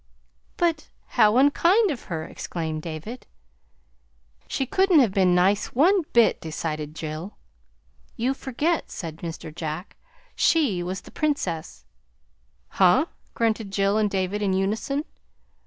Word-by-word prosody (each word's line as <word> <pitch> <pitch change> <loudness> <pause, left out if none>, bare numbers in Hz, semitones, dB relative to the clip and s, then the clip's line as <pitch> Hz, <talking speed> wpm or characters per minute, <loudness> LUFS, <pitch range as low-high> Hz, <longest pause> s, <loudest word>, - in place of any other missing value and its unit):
"But 330 -3 0 0.2
how 220 -2 +4
unkind 340 - +4
of 260 - -6
her!" 160 -3 -4
exclaimed 160 -1 -5
David. 170 +10 -7 1.2
"She 270 - -1
couldn't 380 +3 +3
have 250 -8 +5
been 185 -2 +3
nice 195 +5 +2
one 365 +9 +5
bit!" 235 -1 +4
decided 155 -1 -4
Jill. 160 +5 -6 0.8
"You 245 +3 0
forget," 290 +6 -1
said 160 -3 -6
Mr. 165 -2 -7
Jack. 160 +3 -5 0.4
"She 270 - +2
was 185 +2 -4
the - - -15
Princess." 195 - -2 0.8
"Huh!" 195 - +4 0.3
grunted 225 -2 0
Jill 195 +2 +1
and 210 -1 +2
David 190 +1 -1
in 195 -2 +1
unison. 220 +10 -1
205 Hz, 125 wpm, -25 LUFS, 170-275 Hz, 1.2 s, have